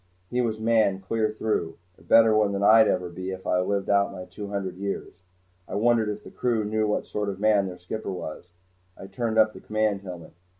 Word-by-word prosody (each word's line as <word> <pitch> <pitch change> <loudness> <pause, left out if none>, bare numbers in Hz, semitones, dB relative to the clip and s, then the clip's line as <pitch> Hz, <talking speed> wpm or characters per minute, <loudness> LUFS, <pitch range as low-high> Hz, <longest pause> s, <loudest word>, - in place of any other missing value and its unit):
He 125 0 +1
was 110 -2 -1
man 110 -4 +2
clear 110 +3 -1
through 105 -6 -2 0.2
a - - -23
better 115 -1 +5
one 105 -2 +2
than 100 0 -1
I'd 110 +1 +7
ever 90 -1 0
be 90 +2 -8
even 95 0 -3
if 95 - -15
I 90 - +2
lived 100 +1 -1
out 100 0 +3
my 90 -2 -8
two 100 +3 -8
hundred 100 -3 -4
years. 100 +1 -5 0.5
I - - -6
wondered 115 0 +2
if 105 0 -5
the - - -12
crew 115 -4 0
knew 110 0 0
what 105 - -1
sort 105 -1 -3
of 95 -1 -5
man 105 -2 +3
their 90 -1 -7
skipper 95 +4 -5
was. 90 -1 -7 0.5
I - - -9
turned 115 +2 -3
up 110 -1 +5
the - - -12
command 110 -2 0
helmet. 90 -4 -9
105 Hz, 225 wpm, -26 LUFS, 95-110 Hz, 0.5 s, I'd